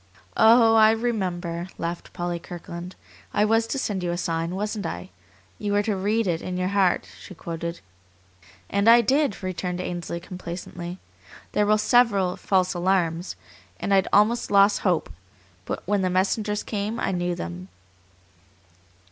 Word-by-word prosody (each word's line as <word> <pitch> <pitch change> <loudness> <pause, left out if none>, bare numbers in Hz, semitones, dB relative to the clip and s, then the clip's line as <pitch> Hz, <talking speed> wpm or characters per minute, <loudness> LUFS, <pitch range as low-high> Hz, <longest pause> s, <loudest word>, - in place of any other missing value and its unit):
"Oh, 225 0 +6
I 220 -1 +7
remember," 185 -7 -2
laughed 170 +1 -5
Polly 175 0 -3
Kirkland. 175 +1 -8 0.4
"I 210 - +4
was 225 +1 +2
to 275 - -2
send 205 -7 -2
you 175 - -2
a 175 - -1
sign, 165 0 -2
wasn't 210 +1 -3
I? - - -7 0.5
You 205 -1 -2
were 205 0 +3
to 210 -1 0
'read 210 +4 0
it 170 -3 -1
in 180 0 -4
your 185 0 0
heart'," 195 -3 +2
she 190 - -11
quoted. 170 +1 -5 0.9
"And 200 +3 +2
I 235 +1 +8
did," 270 -2 +1
returned 180 -1 -3
Ainsley 175 -1 -4
complacently. 175 0 -7 0.5
"There 210 0 +1
were 215 0 +4
several 210 -5 +3
false 185 -2 +1
alarms, 175 -1 0 0.4
and 200 - 0
I'd 195 -1 +4
almost 220 +4 +3
lost 200 +1 +5
hope, 175 - 0 0.5
but - - -4
when 205 +1 +1
the 185 - +1
messengers 205 +3 0
came 210 +2 -3
I - - 0
knew 175 -1 -1
them." 85 - -6
190 Hz, 155 wpm, -24 LUFS, 175-210 Hz, 0.9 s, I